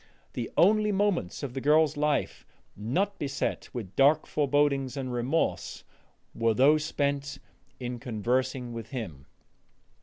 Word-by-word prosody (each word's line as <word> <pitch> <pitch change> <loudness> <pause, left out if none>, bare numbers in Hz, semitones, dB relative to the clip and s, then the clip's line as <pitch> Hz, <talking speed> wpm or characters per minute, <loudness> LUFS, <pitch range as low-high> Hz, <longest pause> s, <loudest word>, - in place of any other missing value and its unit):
The 120 -2 -4
only 210 +3 +4
moments 195 - 0
of 135 -3 -4
the 135 - -4
girl's 150 +1 +4
life 150 -1 0 0.3
not 175 - -1
beset 140 -1 -2
with 110 -7 -7
dark 145 +3 +4
forebodings 140 -2 +1
and 130 -2 -3
remorse 125 +7 -1 0.5
were 115 -1 +1
those 150 +5 +5
spent 140 -2 -1 0.4
in 125 -1 -4
conversing 125 +1 -1
with 115 -1 -7
him. 95 - -6
135 Hz, 125 wpm, -28 LUFS, 120-150 Hz, 0.5 s, those